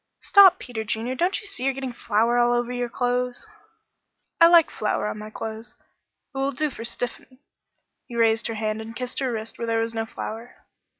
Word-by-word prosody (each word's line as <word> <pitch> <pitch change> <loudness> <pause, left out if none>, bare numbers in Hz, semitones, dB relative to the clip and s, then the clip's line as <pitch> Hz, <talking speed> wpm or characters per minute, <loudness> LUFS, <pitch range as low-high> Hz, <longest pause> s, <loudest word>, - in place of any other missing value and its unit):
"Stop, 385 -2 +7
Peter 230 -8 -5
Junior. 220 +3 -2
Don't 350 +8 0
you - - -10
see 400 -10 -6
you're 270 0 +1
getting 265 -2 -4
flour 230 +1 +1
all 240 0 +4
over 240 0 -1
your 245 -1 -2
clothes?" 245 - -1 0.9
"I 335 - +9
like 340 -2 +6
flour 210 - -1
on 210 - -4
my 215 0 -7
clothes. 220 +1 -7 0.6
It 270 - -4
will 270 +1 +1
do 300 +3 -1
for 230 - -8
stiffening." 245 +2 -5 0.7
He 240 - -9
raised 225 -1 +2
her 225 - -4
hand 215 0 -2
and 225 +1 -9
kissed 250 0 -4
her 265 -2 -1
wrist 225 -1 -6
where 235 - -3
there 225 0 +1
was 230 0 -2
no 225 0 -2
flour. 225 +2 -8
240 Hz, 200 wpm, -24 LUFS, 225-255 Hz, 0.9 s, I